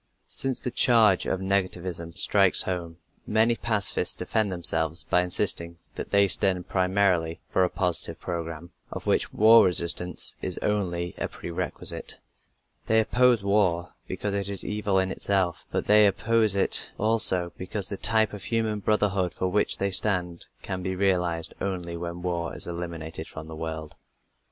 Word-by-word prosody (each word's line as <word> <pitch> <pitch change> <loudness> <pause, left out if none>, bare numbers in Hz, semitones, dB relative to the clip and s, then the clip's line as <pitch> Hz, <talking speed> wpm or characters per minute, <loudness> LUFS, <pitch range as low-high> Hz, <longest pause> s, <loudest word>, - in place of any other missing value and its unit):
Since 135 -2 -3
the 125 - -4
charge 110 -7 +4
of 95 - -2
negativism 90 -3 -2
strikes 100 -2 +4
home, 85 -3 -4 0.3
many 110 +2 +3
pacifists 110 -4 -1
defend 110 -3 -1
themselves 80 -2 0
by 90 - +2
insisting 85 -1 -1 0.2
that - - -7
they 100 0 +4
stand 95 -2 0
primarily 90 -3 +1
for 95 - +2
a 90 - +1
positive 85 -2 0
program, 85 -1 -6 0.2
of - - -7
which - - +1
war 110 +2 +6
resistance 90 0 +2
is - - -3
only 90 -5 -2
a - - -2
pre 85 - -9
requisite. 85 - -3 0.7
They 110 0 +3
oppose 120 0 +3
war 90 -4 +1
because 100 +2 -3
it 100 0 -2
is 100 -2 -4
evil 105 -2 -1
in 95 0 +1
itself, 95 -3 -1
but - - -2
they 105 0 +6
oppose 110 0 +1
it 100 - +1
also 105 -6 +3
because 95 +2 -4
the 100 - -4
type 110 0 +2
of 105 - -7
human 110 -2 -1
brotherhood 100 -3 0
for 95 - -1
which 105 +3 0
they 100 0 -1
stand 90 -3 0 0.2
can 95 -1 -4
be 95 0 -3
realized 90 -3 0
only 90 -3 -4
when 85 +1 -6
war 85 -2 -3
is - - -3
eliminated 85 -2 -6
from 80 -1 -9
the 80 - -8
world. 80 -1 -6
95 Hz, 160 wpm, -26 LUFS, 85-105 Hz, 0.7 s, war